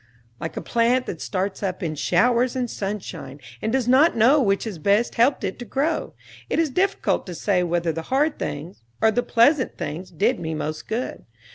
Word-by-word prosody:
Like 165 Hz, -, -5 dB
a -, -, -3 dB
plant 240 Hz, +2 st, +2 dB
that 165 Hz, -, -6 dB
starts 190 Hz, 0 st, -2 dB
up 190 Hz, -1 st, -3 dB
in 160 Hz, -2 st, -1 dB
showers 235 Hz, -, +2 dB
and 250 Hz, -1 st, -1 dB
sunshine 195 Hz, -, -5 dB, 0.2 s
and 220 Hz, -, -1 dB
does 255 Hz, -1 st, 0 dB
not 265 Hz, +4 st, +5 dB
know 260 Hz, +7 st, +5 dB
which 195 Hz, -5 st, +1 dB
has 210 Hz, -7 st, -6 dB
best 205 Hz, +8 st, +2 dB
helped 250 Hz, +2 st, +2 dB
it 190 Hz, +2 st, -3 dB
to 245 Hz, -, -6 dB
grow, 290 Hz, +8 st, -1 dB, 0.3 s
it -, -, 0 dB
is 325 Hz, -3 st, +1 dB
difficult 385 Hz, -, 0 dB
to 180 Hz, -, -6 dB
say 185 Hz, +1 st, +1 dB
whether 170 Hz, -1 st, 0 dB
the 165 Hz, +1 st, -4 dB
hard 290 Hz, +3 st, +1 dB
things 145 Hz, -1 st, -5 dB, 0.2 s
or 220 Hz, -, +4 dB
the 240 Hz, +3 st, +1 dB
pleasant 255 Hz, +4 st, +3 dB
things 170 Hz, +2 st, -5 dB
did 165 Hz, -, +1 dB
me 160 Hz, -1 st, -3 dB
most 155 Hz, 0 st, -4 dB
good. 230 Hz, +4 st, -4 dB
215 Hz, 200 wpm, -23 LUFS, 175-255 Hz, 0.3 s, not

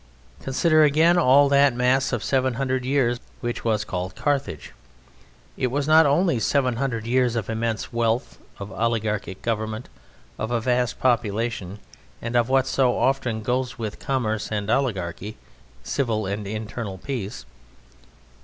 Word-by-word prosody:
Consider, 155 Hz, +4 st, +3 dB
again, 160 Hz, +4 st, +4 dB
all 140 Hz, -1 st, +6 dB
that 140 Hz, -2 st, +4 dB
mass 125 Hz, +2 st, +2 dB
of 120 Hz, -4 st, -2 dB
seven 130 Hz, -2 st, +1 dB
hundred 130 Hz, 0 st, -1 dB
years 130 Hz, -3 st, +1 dB, 0.2 s
which 120 Hz, -1 st, -4 dB
was 110 Hz, -2 st, +1 dB
called 90 Hz, 0 st, -4 dB
Carthage. 140 Hz, -, -2 dB, 0.8 s
It 130 Hz, -, +1 dB
was 140 Hz, +3 st, -1 dB
not 160 Hz, 0 st, +6 dB
only 155 Hz, -2 st, +2 dB
seven 125 Hz, +1 st, +1 dB
hundred 120 Hz, -4 st, -2 dB
years 125 Hz, 0 st, +2 dB
of 115 Hz, -2 st, -2 dB
immense 115 Hz, +1 st, -2 dB
wealth, 115 Hz, +2 st, -1 dB, 0.2 s
of 100 Hz, +1 st, -8 dB
oligarchic 110 Hz, -4 st, -2 dB
government, 110 Hz, 0 st, -3 dB, 0.5 s
of 110 Hz, -, -2 dB
a 120 Hz, -1 st, +1 dB
vast 125 Hz, 0 st, 0 dB
population, 115 Hz, -4 st, 0 dB, 0.4 s
and 115 Hz, +1 st, -5 dB
of 120 Hz, 0 st, +3 dB
what 135 Hz, 0 st, +3 dB
so 130 Hz, -2 st, +1 dB
often 120 Hz, -5 st, 0 dB
goes 125 Hz, +2 st, -1 dB
with 110 Hz, -3 st, -5 dB
commerce 110 Hz, -6 st, -2 dB
and 105 Hz, 0 st, -1 dB
oligarchy 105 Hz, -6 st, -2 dB, 0.5 s
civil 110 Hz, -, -1 dB
and 100 Hz, +1 st, -4 dB
internal 110 Hz, -1 st, -5 dB
peace. 115 Hz, -, -5 dB
120 Hz, 145 wpm, -24 LUFS, 110-135 Hz, 0.8 s, all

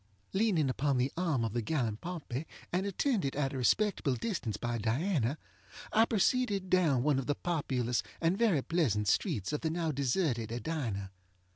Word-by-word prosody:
Leaning 190 Hz, -8 st, +2 dB
upon 135 Hz, +1 st, +1 dB
the 125 Hz, +2 st, +1 dB
arm 160 Hz, -9 st, 0 dB
of 110 Hz, -, -3 dB
the 120 Hz, -, 0 dB
gallant 115 Hz, -4 st, -1 dB
Pompey, 160 Hz, -5 st, -5 dB, 0.3 s
and 190 Hz, +3 st, +1 dB
attended 200 Hz, -, 0 dB
at 140 Hz, -1 st, 0 dB
a -, -, -3 dB
respectable 160 Hz, -, +2 dB
distance 120 Hz, -, -3 dB
by 120 Hz, -1 st, -2 dB
Diana, 130 Hz, -, 0 dB, 0.6 s
I 220 Hz, +1 st, +6 dB
proceeded 210 Hz, -3 st, +1 dB
down 155 Hz, -9 st, +3 dB
one 145 Hz, -2 st, +3 dB
of 135 Hz, -, -4 dB
the 145 Hz, -, +1 dB
populous 130 Hz, -9 st, -1 dB, 0.2 s
and 165 Hz, +2 st, +2 dB
very 195 Hz, -, +2 dB
pleasant 115 Hz, -, +1 dB
streets 130 Hz, -, +1 dB
of 150 Hz, -, -1 dB
the 160 Hz, -, 0 dB
now 165 Hz, -1 st, -1 dB
deserted 130 Hz, -, 0 dB
Edina. 120 Hz, -7 st, -3 dB
145 Hz, 165 wpm, -32 LUFS, 120-180 Hz, 0.6 s, I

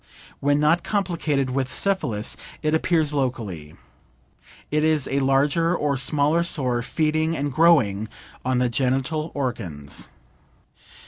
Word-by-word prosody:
When 145 Hz, +1 st, +2 dB
not 165 Hz, +3 st, +3 dB
complicated 165 Hz, -9 st, -1 dB
with 130 Hz, 0 st, -1 dB
syphilis, 130 Hz, -, -1 dB, 0.3 s
it 155 Hz, 0 st, +1 dB
appears 160 Hz, -2 st, +2 dB
locally. 110 Hz, -, -3 dB, 1.0 s
It 150 Hz, +1 st, +1 dB
is 155 Hz, -3 st, +2 dB
a 140 Hz, -, 0 dB
larger 145 Hz, +6 st, +2 dB
or 145 Hz, -4 st, 0 dB
smaller 150 Hz, +4 st, +2 dB
sore 130 Hz, -8 st, +1 dB
feeding 155 Hz, +4 st, 0 dB
and 145 Hz, 0 st, -2 dB
growing 125 Hz, -10 st, +3 dB, 0.3 s
on 130 Hz, 0 st, 0 dB
the 125 Hz, 0 st, +2 dB
genital 135 Hz, +6 st, -1 dB
organs. 95 Hz, -, -4 dB
140 Hz, 120 wpm, -23 LUFS, 125-160 Hz, 1.0 s, not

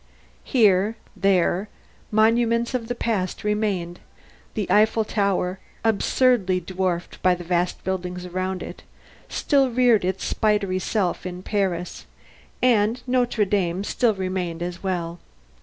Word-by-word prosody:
Here, 210 Hz, -2 st, +3 dB, 0.2 s
there, 195 Hz, +1 st, +2 dB, 0.4 s
monuments 230 Hz, +2 st, +2 dB
of 240 Hz, -3 st, -2 dB
the 245 Hz, -, -3 dB
past 205 Hz, -6 st, -2 dB
remained 205 Hz, -5 st, -1 dB, 0.6 s
the 210 Hz, -, -1 dB
Eiffel 220 Hz, +1 st, +4 dB
Tower, 195 Hz, -3 st, 0 dB, 0.2 s
absurdly 225 Hz, -3 st, +2 dB
dwarfed 180 Hz, -1 st, -3 dB
by 185 Hz, -1 st, +4 dB
the 175 Hz, -, -8 dB
vast 175 Hz, +1 st, -1 dB
buildings 180 Hz, -1 st, -3 dB
around 185 Hz, +1 st, -3 dB
it, -, -, -9 dB, 0.5 s
still 275 Hz, -3 st, +2 dB
reared 240 Hz, -4 st, +3 dB
its 190 Hz, +1 st, -2 dB
spidery 205 Hz, -3 st, +1 dB
self 185 Hz, -1 st, -1 dB
in 180 Hz, 0 st, -6 dB
Paris, 185 Hz, -4 st, -2 dB, 0.6 s
and 235 Hz, 0 st, +3 dB
Notre 245 Hz, -4 st, +1 dB
Dame 190 Hz, -2 st, 0 dB
still 225 Hz, +1 st, +1 dB
remained 185 Hz, -3 st, -3 dB
as 175 Hz, 0 st, -5 dB
well. 175 Hz, -3 st, -3 dB
195 Hz, 125 wpm, -23 LUFS, 180-220 Hz, 0.6 s, Eiffel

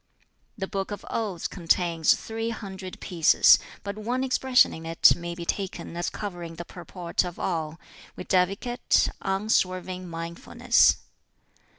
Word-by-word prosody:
"The 195 Hz, -, -2 dB
'Book 195 Hz, -1 st, -4 dB
of 205 Hz, 0 st, -7 dB
Odes' 205 Hz, -7 st, -2 dB
contains 170 Hz, -2 st, +2 dB
three 225 Hz, +1 st, -4 dB
hundred 190 Hz, -4 st, -7 dB
pieces, 170 Hz, -3 st, +5 dB, 0.2 s
but 200 Hz, +1 st, -5 dB
one 245 Hz, +4 st, -1 dB
expression 260 Hz, -1 st, +3 dB
in 160 Hz, -, -8 dB
it 165 Hz, 0 st, +5 dB
may 170 Hz, 0 st, -6 dB
be 170 Hz, -1 st, -7 dB
taken 190 Hz, -2 st, -4 dB
as 175 Hz, -, -2 dB
covering 175 Hz, -5 st, -6 dB
the 170 Hz, +1 st, -7 dB
purport 175 Hz, 0 st, -3 dB
of 175 Hz, -1 st, -6 dB
all, 165 Hz, -2 st, -3 dB, 0.4 s
viz., 185 Hz, +1 st, +1 dB, 0.6 s
Unswerving 185 Hz, -2 st, -1 dB
mindfulness. 165 Hz, 0 st, +2 dB
185 Hz, 125 wpm, -26 LUFS, 170-200 Hz, 0.6 s, pieces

